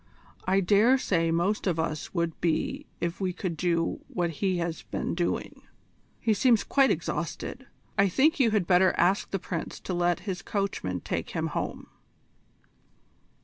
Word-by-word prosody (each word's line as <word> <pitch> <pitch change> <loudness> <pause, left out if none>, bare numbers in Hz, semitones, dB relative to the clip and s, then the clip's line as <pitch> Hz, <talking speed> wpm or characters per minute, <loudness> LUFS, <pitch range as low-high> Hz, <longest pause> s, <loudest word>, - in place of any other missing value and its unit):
I 190 +1 +3
dare 210 +7 +5
say 165 -9 +1
most 175 +6 +1
of 170 -3 +1
us 155 -2 -2
would 170 -2 -2
be 165 -2 -1
if 170 +2 -3
we 185 -2 0
could 180 -2 -3
do 170 0 0
what 175 -2 -1
he 190 -3 +2
has 170 -1 -2
been - - -3
doing. 175 0 -2 0.6
He 220 - +2
seems 230 0 +4
quite 275 -1 +3
exhausted. - - -3 0.3
I 200 0 +5
think 305 - +3
you 250 -4 +5
had 210 -4 +1
better 185 +1 +4
ask 185 +4 +2
the 195 - -1
Prince 170 -2 -5
to 185 - -4
let 175 0 +1
his 190 -3 -4
coachman 195 - -2
take - - -3
him - - -2
home." - - -3
180 Hz, 160 wpm, -28 LUFS, 170-200 Hz, 0.6 s, dare